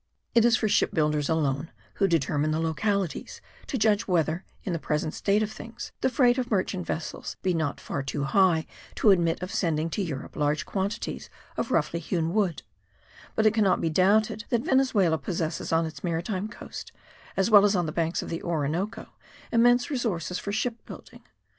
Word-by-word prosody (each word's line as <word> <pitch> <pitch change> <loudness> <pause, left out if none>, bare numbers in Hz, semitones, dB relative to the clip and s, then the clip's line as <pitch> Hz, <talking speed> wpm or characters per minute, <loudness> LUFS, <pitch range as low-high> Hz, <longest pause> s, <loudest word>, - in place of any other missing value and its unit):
It 235 -1 +5
is 240 0 +5
for 220 - 0
ship - - +2
builders 150 -2 +1
alone, 155 -1 0 0.3
who 195 - +3
determine 155 -3 +1
the 155 +1 0
localities, 185 +3 -1 0.3
to 270 - -2
judge 215 -2 +2
whether, 170 -1 +1 0.2
in 185 - -2
the 165 - -1
present 155 +1 -1
state 205 +2 +1
of 215 - -3
things, 230 +2 -8
the - - +3
freight 250 -1 +3
of 245 -1 -2
merchant 185 -3 -1
vessels 155 -2 -4
be 185 - +2
not 160 -4 -1
far 140 - -4
too 140 +1 -3
high 160 +3 +3 0.3
to 210 - +5
admit 170 -2 +2
of 180 - -5
sending 165 -2 0
to 205 - -1
Europe 150 -8 -5
large 150 +1 0
quantities 200 +4 -3 0.3
of - - -2
roughly 165 +1 +1
hewn 165 0 -1
wood; 195 -7 0 0.7
but 220 - +2
it 215 - +5
cannot 210 -4 +3
be 165 - 0
doubted 210 +5 +2
that 235 -1 0
Venezuela 205 -12 +3
possesses 165 +1 -3
on 165 0 +3
its 160 - -8
maritime 180 +4 -2
coast, 230 - -9 0.5
as 195 +3 +2
well 205 -2 +9
as 205 0 +3
on 175 -2 +1
the 155 - -3
banks 165 +1 -1
of - - -7
the 165 - -3
Orinoco, 170 +5 -2 0.5
immense 245 +3 +4
resources 190 - -2
for 200 - -4
ship 230 +3 -2
building. - - -11
180 Hz, 185 wpm, -27 LUFS, 160-215 Hz, 0.7 s, well